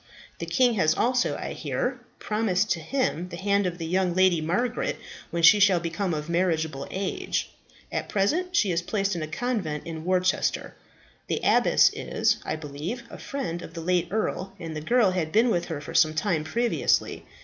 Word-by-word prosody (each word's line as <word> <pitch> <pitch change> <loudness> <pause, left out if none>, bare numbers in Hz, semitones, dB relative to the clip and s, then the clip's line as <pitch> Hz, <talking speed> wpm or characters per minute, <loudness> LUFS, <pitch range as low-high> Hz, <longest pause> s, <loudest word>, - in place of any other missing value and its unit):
The - - -4
king 250 -2 +3
has 155 0 +3
also, 250 +1 +1
I - - -5
hear, - - -2 0.2
promised 210 -2 0
to 170 - +1
him 180 - -1
the 175 - -7
hand 200 +1 +1
of 175 -1 -4
the 165 - -5
young 180 +1 0
Lady 185 -3 +4
Margaret, 220 +10 -1 0.3
when 170 0 -3
she 190 +6 +8
shall 200 -3 +5
become 170 +3 -2
of 150 0 -5
marriageable 160 -5 0
age. 190 0 -2 0.4
At - - -3
present 340 - 0
she 205 - +3
is 170 0 0
placed 195 +1 -1
in 170 - -3
a 155 - -3
convent 175 -5 -3
in 160 -1 -6
Worcester. 185 +1 0 0.5
The - - -1
abbess - - +5
is, - - 0
I - - -2
believe, 155 - -6
a - - -9
friend 210 -12 -4
of - - -10
the 165 - -5
late 180 +1 +1
earl, 195 -2 -2
and 165 -2 -6
the 155 - -4
girl 230 +3 +3
had 170 -4 -2
been 230 +6 +4
with 175 -3 0
her 160 -4 -4
for 145 - -9
some 155 0 +4
time 155 0 0
previously. 235 +9 0
180 Hz, 190 wpm, -26 LUFS, 165-210 Hz, 0.5 s, she